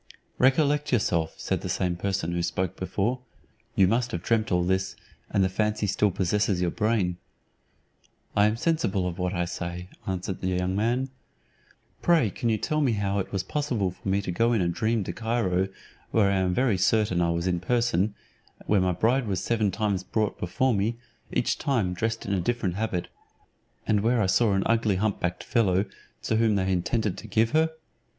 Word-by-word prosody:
"Recollect 145 +2 +3
yourself," 85 -9 +1
said - - -2
the - - -4
same 90 -1 0
person 95 -1 -2
who 85 0 -1
spoke 90 +1 -1
before; 100 +7 -1 0.6
"you 95 -5 +5
must 120 +4 +1
have 85 0 -4
dreamt 110 -2 +1
all 90 -1 +3
this, 95 +1 0 0.3
and 100 - +2
the - - +3
fancy 105 +2 0
still 105 +1 +2
possesses 95 +1 0
your 90 -1 +1
brain." 105 -5 0 1.2
"I 105 0 +5
am 105 +1 0
sensible 115 - 0
of 90 +1 -5
what 90 0 0
I 85 0 0
say," 85 +1 -5 0.2
answered 95 0 -3
the 95 - -1
young 90 0 0
man. 120 +6 0 0.9
"Pray 160 - +3
can 115 - -2
you 110 - +2
tell 155 +8 -1
me 130 -5 +2
how 100 -1 0
it 95 - -4
was 95 -2 -1
possible 120 -5 -1
for 95 - -7
me 100 +1 +1
to 90 - -3
go 115 +7 +2
in 110 - +2
a 85 - +1
dream 110 +5 0
to 90 - -5
Cairo, 105 -4 0 0.4
where 100 -3 +3
I 100 - +2
am 95 -1 +1
very 115 -1 +1
certain 100 -2 +2
I 85 - +2
was 85 +1 -1
in 90 -2 +1
person, 105 -1 +1 0.4
and - - -18
where 105 -2 +3
my 90 -1 +2
bride 120 +6 +1
was 95 -3 -1
seven 110 -3 +1
times 100 -1 -1
brought 110 +2 -1
before 130 +9 +1
me, 110 +3 0 0.3
each - - 0
time 115 -10 0
dressed 115 +5 -2
in 100 - -1
a 95 - +1
different 110 -2 -1
habit, 95 -3 -2 0.8
and 105 - +2
where 115 +4 +2
I 105 - +3
saw 100 +3 +3
an 95 0 +1
ugly 115 -3 +2
hump 100 +2 0
backed 90 0 -2
fellow, 100 -5 +2 0.4
to 110 - +1
whom 110 -2 +3
they 95 -1 +1
intended 95 +3 0
to 110 - -10
give 110 +2 +2
her? 160 +1 +3
100 Hz, 200 wpm, -26 LUFS, 90-115 Hz, 1.2 s, you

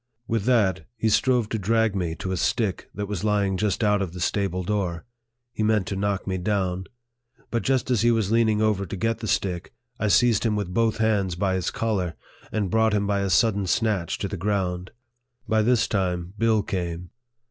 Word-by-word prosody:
With 115 -3 -1
that, 100 -9 +2
he 110 0 +1
strove 115 +2 +2
to 110 - -2
drag 110 +1 +1
me 85 -4 -1
to 95 - -5
a - - 0
stick 95 +3 -1
that 100 0 -3
was 100 -2 -4
lying 100 -2 +1
just 105 +3 0
out 105 -1 +3
of 90 -3 -3
the 90 - -7
stable 95 0 -1
door. 90 -4 -2 0.5
He - - -4
meant 110 -2 +2
to 100 - -2
knock 100 0 -1
me 95 -1 -2
down. 95 -1 -1 0.7
But 115 - 0
just 130 -1 0
as 120 -5 +2
he 120 - +4
was 110 -4 +1
leaning 110 -2 +3
over 100 -3 +1
to 85 - -5
get 115 +4 -1
the 110 - -5
stick, 90 -3 -2 0.2
I 110 - 0
seized 115 +1 +4
him 110 -2 +1
with 100 -3 -3
both 115 0 +2
hands 105 -5 +1
by 95 +1 0
his 95 -2 -1
collar, 95 -7 -1 0.4
and 105 -4 -1
brought 110 -1 +3
him 100 -1 +1
by 100 0 +1
a 100 0 -1
sudden 100 0 +2
snatch 105 -5 0
to 100 - -3
the 100 - -5
ground. 90 -2 -1 0.6
By 110 0 +3
this 115 +1 +3
time, 90 -3 -1
Bill 110 -1 +2
came. 90 -2 -4
100 Hz, 205 wpm, -25 LUFS, 95-110 Hz, 0.7 s, he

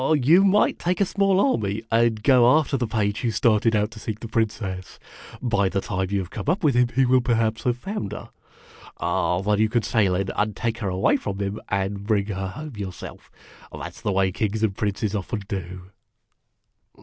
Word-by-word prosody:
" 160 - +4
You 155 +7 +5
might 200 +1 +3
take 180 +1 -1
a 200 - +4
small 195 0 +2
army 110 - 0
and 115 -1 +2
go 125 +1 +6
after 155 -2 0
the 120 -3 -1
page 105 -1 -1
who 120 - 0
started 115 0 +2
out 105 +1 +1
to 110 - -11
seek 110 0 -5
the 115 - -5
Princess. 105 -5 -3 0.5
By 100 -6 +1
the 100 - -1
time 95 -2 -2
you 100 - 0
have 95 -2 -4
come - - -6
up 180 +4 0
with 150 -3 +4
him, 120 0 +3
he 135 0 +4
will 130 +1 +4
perhaps 115 -2 0
have 125 -1 +1
found 190 - -5
her. - - -8 0.7
Then 90 +4 0
you 110 0 +3
can 120 0 +1
sail 100 -5 +2
in 95 +1 -1
and 105 0 0
take 115 0 -2
her 100 -5 -2
away 95 +1 +2
from 100 -1 -5
him, 100 +1 -3
and 100 +1 -2
bring 105 -3 +2
her 95 -2 -4
home 135 +6 -8
yourself. 95 -3 -8 0.4
That 75 +3 -7
's - - -15
the 105 - -1
way 95 0 +2
kings 110 +3 -2
and 100 -3 +1
princes 105 0 -2
often 105 +1 -3
do." 95 -1 -6
110 Hz, 210 wpm, -24 LUFS, 100-120 Hz, 0.7 s, go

